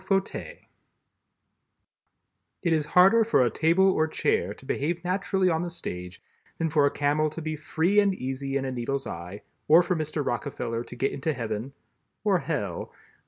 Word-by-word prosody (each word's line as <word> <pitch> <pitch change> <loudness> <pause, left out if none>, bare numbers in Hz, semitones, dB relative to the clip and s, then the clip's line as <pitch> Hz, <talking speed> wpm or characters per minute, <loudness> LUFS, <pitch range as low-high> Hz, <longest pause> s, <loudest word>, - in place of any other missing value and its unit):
FAUTEUIL 195 - -2 2.1
It 170 -3 +2
is 155 -2 0
harder 195 +6 +7
for 215 - +3
a 120 - 0
table 170 - +3
or 155 -3 +1
chair 100 - 0
to 110 - -11
behave 165 +6 -2
naturally 190 +1 0
on 165 -2 +1
the 175 - -3
stage 90 - -7 0.3
than 165 -1 -1
for 145 -2 +4
a - - +3
camel 150 +2 +1
to 155 - -8
be 155 -1 -3
free 165 +6 +1
and 200 -2 +3
easy 135 0 -3
in 135 - -2
a 130 - -2
needle's 130 +2 -3
eye, 90 +4 -7 0.2
or 165 +3 +7
for 180 +1 0
Mr. 155 -2 -2
Rockefeller 120 -2 -3
to - - -10
get 135 +3 0
into 155 +3 -2
Heaven 115 +1 -4 0.5
(or - - +3
Hell?) - - -3
155 Hz, 170 wpm, -27 LUFS, 130-175 Hz, 2.1 s, harder